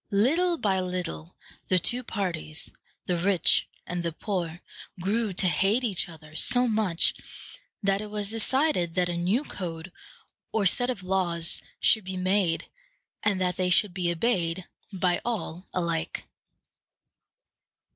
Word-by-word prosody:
Little 325 - +2
by 195 -8 +1
little 180 - -4 0.3
the 185 - +3
two 240 +8 +3
parties, 175 -9 -4 0.3
the 180 - 0
rich 190 0 +3 0.2
and 175 0 -3
the 170 -1 -2
poor, 175 -1 -3 0.4
grew 210 +4 0
to 185 +1 +3
hate 195 +9 +3
each 200 -7 +1
other 155 -2 -13
so 245 +9 +5
much 210 -7 +2 0.7
that 195 0 +2
it 210 - -6
was 210 -1 -1
decided 225 - +2
that 180 -1 +2
a 175 - -1
new 185 +10 +1
code 175 - -6 0.6
or 220 -3 +1
set 245 +7 +2
of 210 -8 -3
laws 175 -3 +1 0.2
should 220 - +3
be 190 0 -4
made, 185 -2 +1 0.5
and 205 -2 +1
that 180 -1 0
they 185 -1 +1
should 185 +1 +4
be 175 -2 0
obeyed 175 -2 0 0.3
by 180 -2 0
all 195 -6 -4
alike. 170 -3 -2
185 Hz, 140 wpm, -27 LUFS, 175-210 Hz, 0.7 s, so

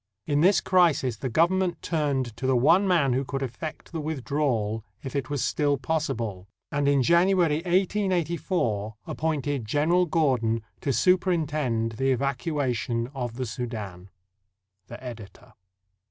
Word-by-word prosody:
In 145 -1 +1
this 190 +4 +5
crisis 165 - +2
the 130 - -3
Government 175 +6 +2
turned 140 -8 -1
to 130 - -2
the 130 - +3
one 170 +11 +4
man 155 -8 +3
who 130 +2 0
could 135 +1 -3
effect 135 +5 -6
the 165 -2 -3
withdrawal 135 -7 -1 0.2
if 135 - -6
it 140 0 -2
was 145 -3 -1
still 145 -2 +1
pos 155 +4 -1
sible, 100 -5 -4 0.2
and 145 -1 0
in 140 -2 +3
January, 170 0 +3
1884, 175 - 0
appointed 145 -5 -2
General 160 +9 +2
Gordon 125 -8 +1 0.2
to 140 - -1
superintend 155 -9 +1
the 135 +1 +1
evacuation 130 - -1
of 120 -4 -4
the 130 +1 -3
Soudan. 110 -7 -6 0.8
The 120 - -10
Editor. 115 -1 -10
140 Hz, 140 wpm, -26 LUFS, 120-165 Hz, 0.8 s, this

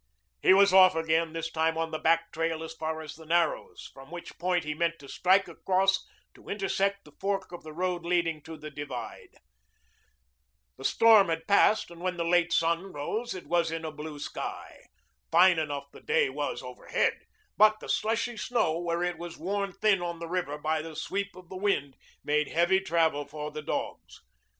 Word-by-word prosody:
He - - +5
was 195 0 +6
off 185 -2 +7
again, 160 0 +1
this 165 0 -4
time 160 0 +1
on 165 0 -2
the 155 - -3
back 165 +1 +2
trail 165 0 -2
as 160 - -7
far 160 0 -4
as 155 -2 -8
the 160 - -13
Narrows, 170 +2 -1
from 135 +1 -13
which 175 0 -9
point 180 -1 +1
he 150 0 -3
meant 170 +2 0
to 140 - -13
strike 190 +6 +3
across 195 +1 +1 0.3
to - - -16
intersect 200 0 -1
the 150 - -15
fork 195 -1 -2
of 175 - -8
the 155 - -10
road 180 +2 -2
leading 170 -3 0
to 160 +1 -9
the 155 0 -9
divide. 145 +1 -7 1.4
The - - -9
storm 220 -5 +6
had 165 0 -2
passed 200 -1 +4
and 170 0 -12
when 180 0 -2
the 170 - -1
late 175 0 +3
sun 170 +3 +1
rose 210 +11 -3
it 185 - -8
was 170 +1 +1
in 165 0 -4
a 155 - -4
blue 150 0 -8
sky. 145 - -7 0.4
Fine 180 -2 +6
enough 140 -2 -4
the - - -14
day 460 -1 +2
was - - -3
overhead, - - -1 0.4
but 215 0 +5
the - - -10
slushy 230 +2 0
snow, 210 -9 0
where 170 0 -1
it 175 -2 -2
was 170 -1 -7
worn 200 +3 -2
thin 200 -1 +2
on 170 -1 -3
the 165 0 -6
river 165 -4 -2
by 155 +1 -1
the 160 0 -9
sweep 200 +4 -3
of 185 -1 -13
the 185 - -7
wind, 185 -9 0 0.3
made 150 0 +1
heavy 175 +3 +3
travel 165 -6 +1
for 150 +1 -6
the 155 0 -6
dogs. - - -5
170 Hz, 195 wpm, -28 LUFS, 160-190 Hz, 1.4 s, off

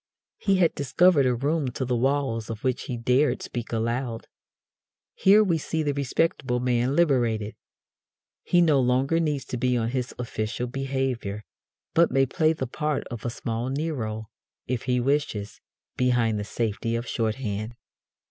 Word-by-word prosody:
He 195 - +2
had 180 -3 +3
discovered 145 +1 +3
a 125 - +2
room 145 +4 0
to 130 - -2
the 125 0 0
walls 130 -3 0
of 115 -1 -6
which 130 -1 -1
he 125 - -4
dared 125 +5 +2
speak 120 -1 -5
aloud. 115 +1 -2 0.9
Here 205 +3 +5
we 170 -5 +1
see 160 +1 -2
the 145 -1 0
respectable 135 -2 0
man 125 +2 +1
liberated. 120 -9 +2 0.9
He 175 - +3
no 155 -5 +4
longer 130 +5 +2
needs 150 -5 -1
to 125 - -4
be 125 0 +1
on 115 -1 0
his 125 -1 -3
official 115 0 -3
behaviour, 130 -5 -2 0.5
but 170 0 +5
may 135 +1 +3
play 155 +4 +2
the 135 - -3
part 150 +4 -2
of 120 -2 -7
a - - +1
small 115 +1 -3
Nero, 125 -7 -3 0.3
if 125 -1 -3
he 125 -1 +1
wishes, 125 -6 -1 0.4
behind 120 -4 +2
the 105 - -4
safety 115 +1 -2
of 115 +1 -2
shorthand. 110 -1 -2
125 Hz, 155 wpm, -26 LUFS, 115-145 Hz, 0.9 s, Here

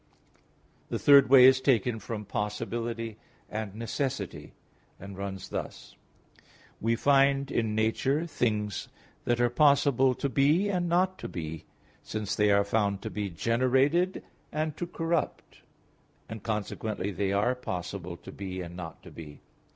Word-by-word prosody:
The - - -1
third 140 -2 +6
way 130 -2 +9
is 130 0 +6
taken 120 -3 +2
from 105 0 -6
possibility 115 +2 -3 0.3
and 105 -2 -4
necessity, 110 - -4 0.5
and 100 +1 -9
runs 95 0 -6
thus. - - -6 0.8
We 115 +1 +1
find 140 +1 +3
in 110 -2 0
nature 130 +8 +1
things 105 - -1 0.4
that 120 0 +1
are 120 -1 +2
possible 140 -2 +4
to 140 - -2
be 150 +9 +3
and 180 -3 0
not 185 +2 +1
to - - -5
be, 80 -2 -6 0.4
since 110 -2 -4
they 105 0 +3
are 100 0 +4
found 100 -1 0
to - - -5
be 105 -2 -3
generated, 130 - +1 0.3
and 155 0 -2
to 175 - -3
corrupt, 165 -1 -3 0.7
and 110 -1 -7
consequently, 105 -1 -3
they 95 +1 -1
are 105 +5 +2
possible 90 -6 -5
to - - -11
be 95 -2 -6
and 85 0 -8
not 85 -2 -8
to - - -12
be. 75 -3 -11
115 Hz, 145 wpm, -28 LUFS, 100-135 Hz, 0.8 s, way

